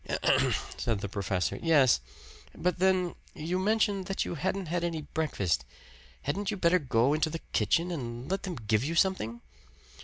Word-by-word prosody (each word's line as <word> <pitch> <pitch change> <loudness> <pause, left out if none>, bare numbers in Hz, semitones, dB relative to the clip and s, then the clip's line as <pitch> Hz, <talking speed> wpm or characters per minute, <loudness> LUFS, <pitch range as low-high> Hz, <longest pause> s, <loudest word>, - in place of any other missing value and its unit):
"Ahem!" - - +3 0.2
said 115 -4 -1
the 100 - -2
professor. 95 -2 -1
"Yes. 145 - +5 0.6
But 180 0 -1
then 185 -2 +2 0.2
you 170 +4 -2
mentioned 205 -1 +1
that 195 - -1
you - - -3
hadn't 190 +3 -2
had 170 +1 -1
any 165 -3 -2
breakfast. 100 - -1 0.6
Hadn't 200 +1 -1
you 210 - -2
better 180 0 +4
go 130 -2 +2
into 155 +1 +1
the 165 - -3 0.2
kitchen 175 +2 +2
and 120 -5 -5
let 195 +1 -1
them 185 -3 -4
give 110 -1 0
you 160 +4 -2
something?" 140 - +1
165 Hz, 165 wpm, -29 LUFS, 120-185 Hz, 0.6 s, Yes